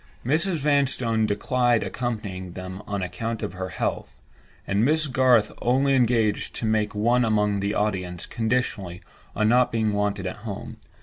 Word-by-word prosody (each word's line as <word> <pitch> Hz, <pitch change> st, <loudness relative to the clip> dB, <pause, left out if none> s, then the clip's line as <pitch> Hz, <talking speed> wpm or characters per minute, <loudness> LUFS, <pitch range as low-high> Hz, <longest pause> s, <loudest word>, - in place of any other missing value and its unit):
Mrs. 170 Hz, +8 st, +1 dB
Vanstone 130 Hz, -6 st, +1 dB
declined 120 Hz, +3 st, +1 dB
accompanying 100 Hz, -7 st, -4 dB
them 95 Hz, +1 st, -7 dB
on 100 Hz, -2 st, -2 dB
account 110 Hz, +6 st, -4 dB
of -, -, -3 dB
her 95 Hz, 0 st, -5 dB
health; -, -, -3 dB, 0.5 s
and 100 Hz, +2 st, +1 dB
Miss 155 Hz, +4 st, +2 dB
Garth 125 Hz, -5 st, +3 dB
only 135 Hz, +3 st, +2 dB
engaged 115 Hz, -5 st, +1 dB
to -, -, -3 dB
make 110 Hz, -1 st, 0 dB
one 120 Hz, +4 st, +3 dB
among 105 Hz, -2 st, +1 dB
the 100 Hz, +2 st, -1 dB
audience 90 Hz, -4 st, -2 dB
conditionally 110 Hz, -6 st, -2 dB, 0.3 s
on 110 Hz, -, +2 dB
not 125 Hz, +1 st, +4 dB
being 110 Hz, -2 st, 0 dB
wanted 100 Hz, -1 st, -1 dB
at 95 Hz, -, -4 dB
home. 105 Hz, -2 st, -7 dB
110 Hz, 150 wpm, -25 LUFS, 100-125 Hz, 0.5 s, not